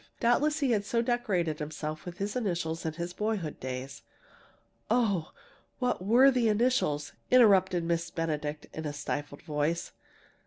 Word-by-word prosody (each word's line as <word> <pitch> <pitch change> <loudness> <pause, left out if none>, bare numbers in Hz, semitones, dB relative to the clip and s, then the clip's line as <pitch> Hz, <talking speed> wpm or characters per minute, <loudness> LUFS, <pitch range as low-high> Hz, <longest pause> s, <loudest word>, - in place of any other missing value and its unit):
Doubtless 295 +6 +2
he 270 -3 +2
had 210 -3 +2
so 230 +3 0
decorated 200 -10 0
himself 155 0 -5
with 175 -1 -7
his 200 +3 -3
initials 170 -8 -2
in 160 - -2
his 170 +2 -5
boyhood 210 -7 -2
days 130 +1 -6 0.5
" - - -36
"Oh, 210 -8 +1 0.5
what 250 -7 -1
were 245 +7 +6
the 245 -3 +2
initials?" 210 - +1 0.2
interrupted 190 -7 +5
Miss 170 0 -1
Benedict 150 -2 -3
in 160 - -5
a 145 - -3
stifled 145 0 -4
voice. 155 +1 -1
175 Hz, 150 wpm, -29 LUFS, 155-230 Hz, 0.5 s, were